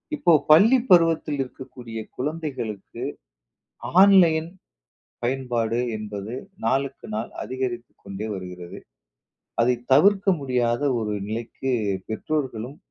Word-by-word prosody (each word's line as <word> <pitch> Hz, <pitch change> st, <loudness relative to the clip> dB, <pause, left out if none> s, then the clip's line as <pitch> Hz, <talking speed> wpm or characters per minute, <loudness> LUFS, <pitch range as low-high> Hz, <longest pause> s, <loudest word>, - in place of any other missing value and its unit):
இப்போ 175 Hz, -, +2 dB, 0.2 s
பள்ளி 210 Hz, +12 st, +7 dB
பருவத்துல 165 Hz, -4 st, +4 dB
இருக்கக்கூடிய 125 Hz, -3 st, -10 dB, 0.2 s
குழந்தைகளுக்கு, 130 Hz, -8 st, -4 dB, 1.0 s
ஆன்லைன் 170 Hz, -5 st, +6 dB, 0.8 s
பயன்பாடு 120 Hz, -2 st, -1 dB, 0.2 s
என்பது 105 Hz, +1 st, -6 dB, 0.3 s
நாளுக்கு 135 Hz, +3 st, -1 dB
நாள் 110 Hz, +2 st, -3 dB
அதிகரித்துக் 125 Hz, -2 st, -5 dB
கொண்டே 100 Hz, +3 st, -6 dB
வருகிறது. 90 Hz, -2 st, -8 dB, 0.8 s
அதை 125 Hz, +2 st, +4 dB, 0.2 s
தவிர்க்க 195 Hz, +7 st, +5 dB
முடியாத 125 Hz, -3 st, 0 dB, 0.2 s
ஒரு 105 Hz, -2 st, -2 dB
நிலைக்கு 115 Hz, +4 st, -4 dB, 0.4 s
பெற்றோர்களும், 130 Hz, 0 st, -3 dB
125 Hz, 90 wpm, -24 LUFS, 115-155 Hz, 1.0 s, பள்ளி